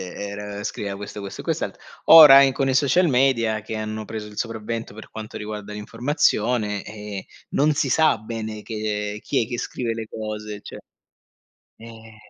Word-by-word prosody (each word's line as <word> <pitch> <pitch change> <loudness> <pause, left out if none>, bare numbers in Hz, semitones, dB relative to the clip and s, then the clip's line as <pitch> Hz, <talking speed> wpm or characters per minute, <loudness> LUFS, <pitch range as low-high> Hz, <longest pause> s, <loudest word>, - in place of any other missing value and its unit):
era 100 0 -6
scriveva 100 -1 -4
questo, 100 +1 -8
questo 100 -1 -7
e - - -15
quest'altro. - - -3 0.3
Ora 150 -4 +10
e - - +7
in 135 - -1
con 135 0 0
i 135 - +1
social 145 +7 +3
media 125 -5 +2
che 110 +1 -6
hanno 110 0 -4
preso 110 0 -6
il 105 - -13
sopravvento 115 -1 -4
per 110 - -12
quanto 110 -1 -7
riguarda 105 -1 -6
l'informazione, 115 -2 0
ehm, 105 -2 -7 0.3
non 150 +2 +2
si 145 - 0
sa 155 +1 +4
bene 110 -1 -6
che, 105 -2 -3
ehm 105 - -7
chi 130 +1 0
è - - -14
che 120 0 -4
scrive 115 -2 -3
le 115 -1 -6
cose, 105 -1 -6
cioè - - -10 1.0
Eh. 115 -1 -13
110 Hz, 180 wpm, -23 LUFS, 105-125 Hz, 1.0 s, Ora